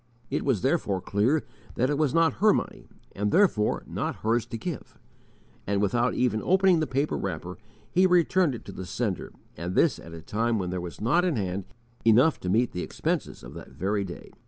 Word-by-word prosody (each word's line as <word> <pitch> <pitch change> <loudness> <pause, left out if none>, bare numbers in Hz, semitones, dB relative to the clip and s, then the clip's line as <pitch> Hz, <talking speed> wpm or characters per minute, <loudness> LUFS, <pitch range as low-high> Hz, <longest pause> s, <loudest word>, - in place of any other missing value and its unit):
It - - -1
was 130 -8 +1
therefore 130 - +1
clear 110 - +1 0.3
that 130 +4 +1
it - - +1
was 150 -4 +2
not 165 0 +2
her 215 0 +6
money, - - -4 0.2
and 105 +1 -2
therefore 170 - +2
not - - -3
hers 115 +1 +1
to 115 - -5
give; 165 +6 -6 0.7
and 100 0 +1
without 120 +5 +1
even 110 -4 +1
opening 190 -1 +4
the 155 - 0
paper 140 +3 0
wrapper 90 -1 -5 0.3
he 185 +1 +4
returned 180 -4 +3
it - - -10
to - - -8
the 95 -1 -7
sender 105 -5 -3 0.2
and 85 +3 -5
this 165 - +3
at 85 0 -10
a 80 - -10
time 115 +4 0
when 90 -3 -2
there 90 -1 -3
was 85 -1 -7
_not 150 +11 +2
in 180 -5 +1
hand 95 -3 -2 0.4
enough 120 +8 +5
to 90 - -4
meet 115 +5 +2
the 90 - -4
expenses - - -3
of - - -10
that 85 - -11
very 100 +3 -1
day. 90 -3 -9
115 Hz, 205 wpm, -27 LUFS, 95-155 Hz, 0.7 s, her